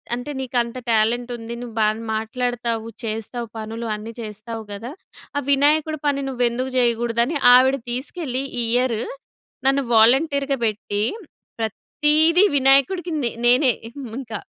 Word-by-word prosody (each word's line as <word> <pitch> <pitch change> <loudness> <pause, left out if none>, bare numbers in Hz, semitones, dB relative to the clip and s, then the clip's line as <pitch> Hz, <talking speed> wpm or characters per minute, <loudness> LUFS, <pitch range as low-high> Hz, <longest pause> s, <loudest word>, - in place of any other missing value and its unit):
అంటే 245 +4 -6
నీకంత 245 -2 -1
టాలెంట్ 235 +3 +1
ఉంది. 230 +1 -7
నువ్వు 240 -3 -8
బాగా 215 +1 +1
మాట్లాడతావు, 235 0 -2 0.2
చేస్తావు 225 +2 -4
పనులు 225 +2 -5
అన్ని 220 +2 -8
చేస్తావు 220 +1 -7
గదా! 220 +5 -6 0.5
ఆ - - +3
వినాయకుడి 300 +2 +3
పని 280 -1 +1
నువ్వెందుకు 250 0 -1
జేయకూడదని 235 +3 +1 0.2
ఆవిడ 260 +2 +6 0.2
తీసుకెళ్ళి, 265 +1 -3 0.2
ఈ - - +2
ఇయర్ 245 -3 +1 0.7
నన్ను 275 +1 +3
వాలంటీర్‌గా 275 +4 +4
బెట్టి, 205 -1 -2 0.6
ప్రత్తీదీ 305 - +2
వినాయకుడికి 275 +7 +3
నే 235 - 0 0.2
నేనే 250 0 +5 0.2
హ్మ్, 260 -5 -7
ఇంకా. 225 -5 -6
245 Hz, 125 wpm, -22 LUFS, 225-275 Hz, 0.7 s, ఆవిడ